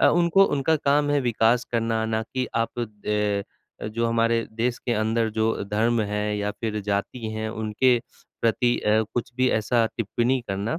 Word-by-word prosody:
अ, - - +6
उनको 175 +3 +4
उनका 145 +3 +2
काम 145 0 +2
है 145 - +3
विकास 120 0 +2
करना 115 -1 0
ना 110 0 -1
कि 130 +3 -3
आप 115 +1 -1
अ 120 - 0 1.0
अ, - - -3
जो 115 +2 -1
हमारे 115 0 +1
देश 120 +2 -1
के 120 - -2
अंदर 110 +1 +1
जो 110 0 +2 0.2
धर्म 115 +2 +2
है 105 0 -1
या 105 0 -1
फ़िर 110 0 -4
जाति 100 +4 -2
हैं 110 0 -3
उनके 110 +3 +2 0.4
प्रति 120 +1 +2
अ, 110 +1 +2
कुछ 120 0 -2
भी 130 0 +3
ऐसा 115 +2 +2
टिप्पणी 120 +3 0
करना। 100 - -2
115 Hz, 180 wpm, -24 LUFS, 110-125 Hz, 1.0 s, अ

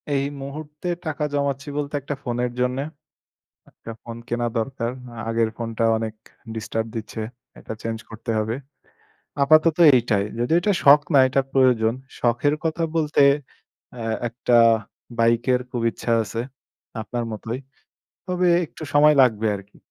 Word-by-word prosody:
এই 135 -1 +1 0.2
মুহূর্তে 150 +4 -7 0.2
টাকা 155 -1 -2
জমাচ্ছি 140 -1 -1
বলতে 145 0 -3
একটা 140 +2 -4
ফোনের 120 0 -1
জন্যে। 125 +2 0 0.9
একটা 115 - -10
ফোন 115 0 -8
কেনা 120 0 -1
দরকার। 115 0 -2 0.2
আ - - -10
আগের 115 -1 +1
ফোনটা 115 -1 -3
অনেক 110 -1 -4 0.4
ডিস্টার্ব 110 0 -3
দিচ্ছে। 110 0 -5 0.4
এটা - - -7
চেঞ্জ 115 -1 -3
করতে 115 +1 -5
হবে। 110 +2 -1 0.9
আপাতত 155 +2 +5 0.2
এইটাই। 115 -5 +2 0.2
যদিও 125 +8 +2
এটা 205 +3 +2
শখ 145 +1 +8
না, 140 - +7
এটা 135 +1 +2
প্রয়োজন। 125 -4 +3 0.3
শখের 120 +5 +2
কথা 165 +1 -1
বলতে 150 -2 +2 0.7
অ্যা 120 -2 -6 0.2
একটা 120 +1 0 0.6
বাইকের 120 +2 +3
খুব 125 -2 -3
ইচ্ছা 115 - -4
আছে। 115 +2 -4 0.6
আপনার 120 +2 -3
মতোই। 115 +3 -5 0.7
তবে 180 0 +1 0.2
একটু 160 - -16
সময় 150 +1 +6
লাগবে 110 -4 +3
আরকি। 100 0 -12
125 Hz, 140 wpm, -23 LUFS, 115-145 Hz, 0.9 s, শখ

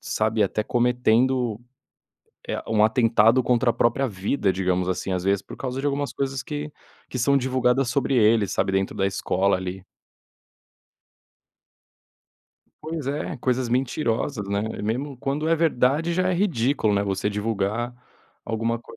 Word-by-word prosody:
sabe, 110 -6 0
até 105 +2 0
cometendo, 125 0 +1 0.9
eh, - - -3
um 110 -1 +3
atentado 115 +1 +4
contra 120 0 +2
a - - +1
própria 120 +4 +1
vida, 100 0 -1
digamos 90 -1 0
assim, 95 +1 -2
às 90 0 -2
vezes, 100 0 +2
por - - -11
causa 130 0 -4
de 145 - -2
algumas 145 0 -1
coisas 135 -2 -3
que 150 0 -5 0.4
que 125 - -5
são 140 +3 +3
divulgadas 130 0 +1
sobre 135 0 0
eles, 110 -2 +3
sabe, 95 - 0
dentro 95 0 0
da 95 - 0
escola, 95 0 +1
ali. 95 0 -6 3.0
Pois 155 -3 -5
é, 145 0 -3
coisas 125 0 0
mentirosas, 125 -3 -1
né, 100 0 0 0.2
mesmo 130 +6 -2
quando 140 +5 -2
é 165 - +3
verdade, 155 +1 +2
já 185 +1 +1
é 185 - +1
ridículo, 135 - +1
né, 100 - +2
você 100 0 -1
divulgar 110 +3 -2 0.5
alguma 115 +1 -1
coi 120 - -14
120 Hz, 150 wpm, -24 LUFS, 105-135 Hz, 3.0 s, atentado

